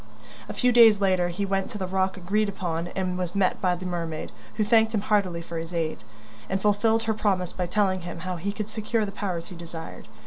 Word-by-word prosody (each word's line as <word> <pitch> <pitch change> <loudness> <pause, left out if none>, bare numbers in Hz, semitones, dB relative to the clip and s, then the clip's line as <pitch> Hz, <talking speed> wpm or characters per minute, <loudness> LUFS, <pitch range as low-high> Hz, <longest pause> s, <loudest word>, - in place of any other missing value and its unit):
A - - -3
few 250 -1 +3
days 225 -3 +7
later 185 -3 +2
he 180 +3 -2
went 195 -1 -1
to - - -6
the 190 - -2
rock 190 +1 0
agreed 200 +4 0
upon 175 -4 -3
and 185 -1 -1
was 180 0 -3
met 190 -2 +2
by 180 -2 +2
the 180 +1 -7
mermaid, 165 -3 -3 0.2
who 215 - +2
thanked 225 +1 +4
him 205 - +1
heartily 195 -5 +1
for 165 0 -5
his 165 +2 -6
aid, 160 -7 -2 0.5
and 190 - 0
fulfilled 220 +3 +2
her 225 -1 +1
promise 190 -4 0
by 180 -1 -2
telling 190 0 +1
him 170 -1 -7
how 185 0 -3
he 195 +5 -2
could 210 0 -4
secure 220 0 -1
the 200 - -5
powers 185 -5 -4
he 185 - -9
desired. 165 -5 -8
190 Hz, 230 wpm, -26 LUFS, 175-210 Hz, 0.5 s, days